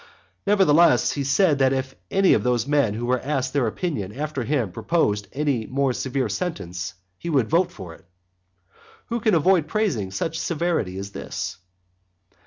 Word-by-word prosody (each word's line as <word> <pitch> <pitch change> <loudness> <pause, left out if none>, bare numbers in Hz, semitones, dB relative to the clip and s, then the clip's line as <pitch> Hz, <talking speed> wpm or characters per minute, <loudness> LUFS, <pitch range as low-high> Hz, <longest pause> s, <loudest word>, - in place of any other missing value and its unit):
nevertheless, 175 -5 +5
he 140 - -2
said 145 +2 +3
that 135 -1 +4
if 130 0 -2 0.2
any 195 -1 +4
of - - +3
those 120 -2 +1
men 140 -7 +2
who 120 +2 -3
were 125 +1 +1
asked 135 -1 -2
their 140 -5 +2
opinion 110 - -3
after 145 +2 -3
him 115 -5 0
proposed 105 - 0
any 135 -6 -1
more 135 0 0
severe 130 +1 -1
sentence, 90 - -4 0.2
he 170 - -5
would 135 -8 +2
vote 175 +2 +2
for 90 - -9
it. 85 - -18 1.0
Who 235 0 -1
can 220 -4 +2
avoid 165 0 +3
praising 165 - 0
such 160 +12 -3
severity 165 - -1
as 100 +1 -6
this? - - -5
140 Hz, 165 wpm, -23 LUFS, 110-165 Hz, 1.0 s, nevertheless